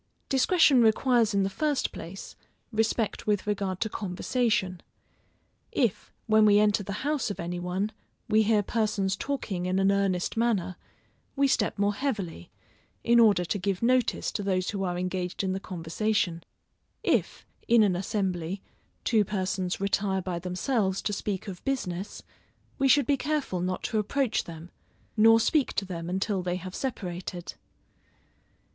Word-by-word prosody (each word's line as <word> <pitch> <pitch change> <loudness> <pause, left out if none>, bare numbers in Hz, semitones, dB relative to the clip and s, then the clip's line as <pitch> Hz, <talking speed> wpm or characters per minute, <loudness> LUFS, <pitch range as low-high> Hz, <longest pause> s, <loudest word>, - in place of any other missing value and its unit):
Discretion 275 -1 +5
requires 230 -1 +3
in 195 - +3
the - - +1
first 295 +4 0
place, 175 +4 -9 0.4
respect 220 -1 0
with 205 -2 +1
regard 195 -3 -2
to - - +1
conversation. 210 -1 -1 0.9
If, 235 - 0
when 220 -1 +5
we 205 -1 +6
enter 210 0 +3
the 200 +5 -5
house 295 -4 0
of 205 - -5
any 175 +1 -3
one, 185 +4 -2 0.4
we 220 -1 +4
hear 215 -1 +3
persons 205 -3 0
talking 205 -9 -3
in 185 +1 0
an 195 +1 +3
earnest 195 -3 0
manner, 210 -6 0 0.6
we 280 0 +3
step 265 - +1
more 205 +1 +2
heavily, 200 - -3 0.5
in 235 0 +5
order 205 -6 +5
to 200 - -2
give 195 +2 -2
notice 255 +1 +2
to - - -3
those 185 -2 0
who 200 -2 -3
are 180 -1 -1
engaged 180 +1 -2
in 190 -1 0
the 190 - -2
conversation. 180 0 -1 0.6
If, - - 0 0.2
in 235 -2 +6
an 195 -3 +2
assembly, 185 -1 -2 0.4
two 220 -3 +3
persons 185 -2 -2
retire 195 -1 0
by 175 -2 -3
themselves 190 +2 -1
to 205 - -1
speak 200 -1 -3
of 185 -3 -7
business, 200 -8 -3 0.6
we 275 - +3
should 280 +1 +5
be 280 +2 +2
careful 280 -11 -1
not 185 +1 -2
to 220 - 0
approach 240 +2 0
them, 165 +1 -10 0.4
nor 225 +1 +6
speak 285 +4 +2
to 200 - -1
them 170 -2 -5
until 190 +1 -1
they 180 0 -2
have 185 0 -7
separated. 180 -8 -5
200 Hz, 155 wpm, -28 LUFS, 185-225 Hz, 0.9 s, we